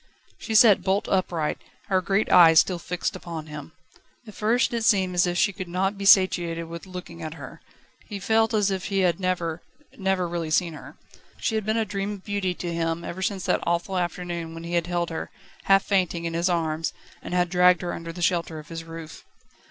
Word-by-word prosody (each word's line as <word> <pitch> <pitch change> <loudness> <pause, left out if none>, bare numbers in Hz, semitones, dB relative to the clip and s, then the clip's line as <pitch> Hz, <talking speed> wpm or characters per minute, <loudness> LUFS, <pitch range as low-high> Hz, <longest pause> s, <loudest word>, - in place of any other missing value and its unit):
She 220 - -4
sat 220 -3 +7
bolt 195 +1 0
upright, 175 -5 -1 0.3
her 190 -1 +1
great 195 +3 0
eyes 165 -3 +8
still 180 -2 +1
fixed 180 +1 -3
upon 170 -4 -7
him. 150 0 -9 0.5
At 215 - -11
first 230 +5 +1
it 230 -1 -1
seemed 190 -4 +3
as 180 0 +3
if 175 0 -1
he 200 +2 +2
could 185 -1 -6
not 190 +3 -1
be 200 0 -6
satiated 175 -4 +4
with 170 +3 -9
looking 180 -2 -9
at 160 0 -6
her; - - -10 0.5
he 205 - -5
felt 220 +3 +2
as 205 -2 +2
if 190 -1 -3
he 195 -1 0
had 175 -2 +2
never, 175 -3 -2 0.3
never 190 -2 0
really 170 -2 -3
seen 165 +1 +1
her. 155 - -11 0.4
She - - -2
had 215 -1 -2
been 220 +1 +1
a 225 - +1
dream 200 +1 -3
of 195 -2 -10
beauty 200 -3 -1
to 170 -1 -4
him 165 0 -2
ever 185 +2 -6
since 190 -1 -2
that - - +2
awful 170 +3 -1
afternoon 175 -2 -3
when 165 - -8
he 170 +1 -6
had 170 -1 +1
held 175 -1 -1
her, 160 - -5 0.4
half 195 0 +5
fainting, 180 -4 0
in 165 - -3
his 170 +2 +1
arms, 160 -2 -1 0.3
and 180 - -5
had 180 -1 +1
dragged 180 -1 +4
her 175 - -3
under 165 0 -6
the 175 +1 -6
shelter 170 -2 0
of 155 - -11
his 165 -1 -6
roof. 165 -1 -10
180 Hz, 215 wpm, -25 LUFS, 170-195 Hz, 0.5 s, eyes